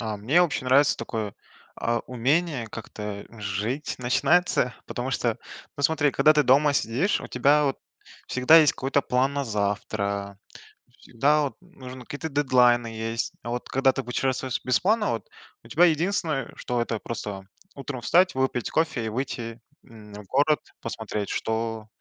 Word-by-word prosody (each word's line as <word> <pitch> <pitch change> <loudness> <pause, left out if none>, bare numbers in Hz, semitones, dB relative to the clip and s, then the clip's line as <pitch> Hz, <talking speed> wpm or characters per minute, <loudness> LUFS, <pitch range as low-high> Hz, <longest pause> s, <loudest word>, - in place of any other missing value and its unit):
А 110 -2 -3
мне 130 +12 +3
вообще 140 -6 -1
нравится 135 +3 +4
такое, 110 -3 -4 0.4
а, 120 0 0
умение 130 +1 0
как-то, 105 -2 -7
э, 115 - -14
жить 105 +8 -3
начинается, 125 +1 +2
потому 125 +2 -4
что, 120 -3 -1 0.4
ну 140 - -5
смотри, 150 0 +3
когда 155 +4 +5
ты 150 -1 +3
дома 140 +3 +4
сидишь, 135 - 0
у - - -7
тебя, 145 +4 +3
вот, 135 -2 -1 0.5
всегда 130 +6 +5
есть 155 -3 +5
какой-то 135 +2 0
план 130 +3 +1
на 140 - -1
завтра, 100 -2 -2 0.6
всегда, 145 +6 +1
вот, 140 - -3
нужно 130 -8 -11
какие-то 160 +1 -5
дедлайны 125 -4 +3
есть. 115 +1 -3
А, 120 - -5
вот, 120 +1 -4
когда 135 0 +3
ты 135 - -3
путешествуешь 130 +1 -2
без 125 - +2
планов, 210 +2 +2
вот, 115 - -4 0.4
у - - -14
тебя 175 +3 +4
единственное, 165 -3 +1
э, - - -14
что 125 -2 -2
это 115 -1 -2
просто 105 -4 -6 0.3
утром 135 -2 -6
встать, 180 +9 +3
выпить 130 -2 -1
кофе 155 -8 0
и - - -1
выйти, 115 -1 -4 0.2
м, 110 -3 -14
в 105 0 -9
город, 145 +7 +2 0.2
посмотреть, 110 -2 -4
что 110 -1 -2
125 Hz, 165 wpm, -25 LUFS, 115-145 Hz, 0.6 s, когда